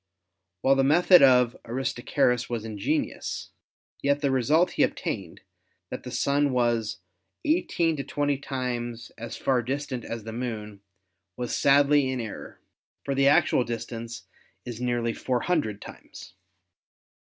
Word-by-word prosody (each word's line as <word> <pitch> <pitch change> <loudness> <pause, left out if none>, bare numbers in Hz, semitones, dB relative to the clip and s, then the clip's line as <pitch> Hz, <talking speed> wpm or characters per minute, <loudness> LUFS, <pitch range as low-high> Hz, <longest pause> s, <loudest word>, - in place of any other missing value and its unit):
While 135 - +4
the 135 0 +2
method 175 +6 +6
of 125 -3 +5
Aristarchus 125 0 0
was 115 -2 -3
ingenious, 105 -3 -3 0.5
yet 140 +1 +1
the 140 -2 +1
result 150 +8 +3
he - - -1
obtained, - - -2 0.5
that - - -5
the - - -8
Sun 140 0 +1
was 120 -3 0 0.5
18 170 - +1
to 140 - -3
20 145 0 0
times 120 -4 -4
as 115 - -7
far 130 -2 +1
distant 130 0 -4
as 115 -1 -6
the 110 +1 -7
Moon, 110 -4 -5 0.6
was 125 -1 -2
sadly 140 0 +4
in 130 -1 -2
error, 110 -3 -7 0.5
for 140 - -1
the 135 0 +3
actual 140 -3 +4
distance 115 0 -6 0.4
is 120 -1 -6
nearly 120 -2 0
four 125 0 -1
hundred 145 - -1
times. - - -12
125 Hz, 135 wpm, -26 LUFS, 115-140 Hz, 0.6 s, method